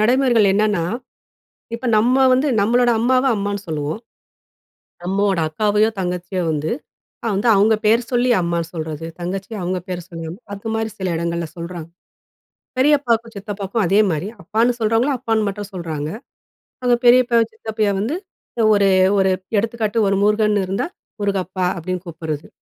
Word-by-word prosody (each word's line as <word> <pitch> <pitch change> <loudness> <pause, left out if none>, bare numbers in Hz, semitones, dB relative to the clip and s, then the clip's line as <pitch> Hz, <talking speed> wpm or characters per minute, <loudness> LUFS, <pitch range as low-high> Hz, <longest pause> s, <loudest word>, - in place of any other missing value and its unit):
நடைமுறைகள் 240 -2 +4
என்னன்னா, 210 -4 +2 0.9
இப்ப 245 +2 -5
நம்ம 245 +4 +3 0.2
வந்து, 265 +3 +2
நம்மளோட 240 +3 +3
அம்மாவ 255 +3 +2
அம்மான்னு 200 0 -2
சொல்லுவோம். 155 +5 -3 1.1
அம்மாவோட 195 -1 +1
அக்காவையோ 210 +5 +2
தங்கச்சியோ 180 0 -2
வந்து 155 +1 -2 0.6
அ - - +1
வந்து 205 +5 0
அவுங்க 210 +3 +4
பேர் 225 +3 +4
சொல்லி 245 +1 +2
அம்மா 170 -1 0
சொல்றது, 160 -1 -5
தங்கச்சிய 190 +5 -4
அவுங்க 180 +1 -1
பேர் 180 -1 -4
சொல்லி 165 -1 -7
அம் 175 - -8 0.2
அதுமாரி 220 +2 -3
சில 190 -1 -3
எடங்கள்ல 170 0 -2
சொல்றாங்க. 170 -1 -6 0.9
பெரியப்பாக்கும், 255 -5 +2
சித்தப்பாக்கும் 200 +1 -3
அதே 200 +4 +4
மாரி 165 +5 -2
அப்பான்னு 225 +7 +1
சொல்றவங்கள, 225 +6 +2
அப்பான்னு 225 -3 0
மட்டும் 200 0 -6
சொல்றாங்க. 160 -5 -4 0.7
அவுங்க 245 -1 +3
பெரியப்பாவ 240 -1 +6
சித்தப்பாவ 215 -2 -1
வந்து 240 +11 -1 0.6
ஒரு 200 -1 +4 0.3
ஒரு 190 0 +3 0.3
எடுத்துக்காட்டு 225 0 0
ஒரு 195 - +2
முருகன்னு 210 -2 +2
இருந்தா, 195 - -1 0.3
"முருகப்பா" 185 -2 -1
அப்டீன்னு 180 +2 -4
கூப்புட்றது. 160 -3 -5
205 Hz, 135 wpm, -20 LUFS, 180-230 Hz, 1.1 s, பெரியப்பாவ